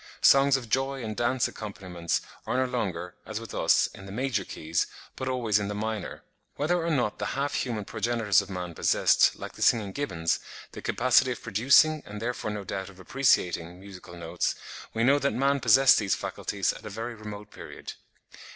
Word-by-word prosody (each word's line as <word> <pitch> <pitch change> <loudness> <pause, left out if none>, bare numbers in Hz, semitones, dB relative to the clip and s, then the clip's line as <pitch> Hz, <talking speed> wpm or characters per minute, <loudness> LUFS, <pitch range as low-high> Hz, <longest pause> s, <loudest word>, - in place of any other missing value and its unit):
Songs 135 0 +6
of 125 -3 -7
joy 135 +2 -1
and 110 -1 -4
dance 120 +2 +1
accompaniments 90 -5 -4 0.3
are - - 0
no 130 - +2
longer, 95 -9 -3
as 110 0 -5
with 115 - -9
us, - - +3
in 95 - -11
the - - -8
major 120 -2 -1
keys, 80 -1 -2 0.3
but 130 - -4
always 120 -5 +1
in 100 - -2
the 105 - -4
minor." 110 -1 -4 0.3
Whether 165 +4 0
or 170 - -1
not 120 -10 0
the 100 - -2
half 140 +1 -1
human 110 -5 -2
progenitors 110 -2 +1
of 100 - -10
man 90 -2 -5
possessed, - - +3
like - - -7
the - - -12
singing 105 -4 +3
gibbons, 90 -11 -1 0.3
the - - -9
capacity 130 +1 +3
of - - -12
producing, 140 +8 +4
and 105 +1 -8
therefore 120 -1 -3
no 105 -1 -4
doubt 95 0 -5
of 95 -1 -16
appreciating, 90 -7 +1
musical 95 -2 -11
notes, 85 +1 -2 0.4
we 115 - -1
know 140 +4 +5
that 140 0 0
man 140 +2 +2
possessed 135 0 +6
these 100 -4 +1
faculties 100 -2 -2
at - - -12
a 110 - -6
very 115 +4 -5
remote 105 -1 -9
period. - - -9
110 Hz, 190 wpm, -27 LUFS, 100-130 Hz, 0.4 s, Songs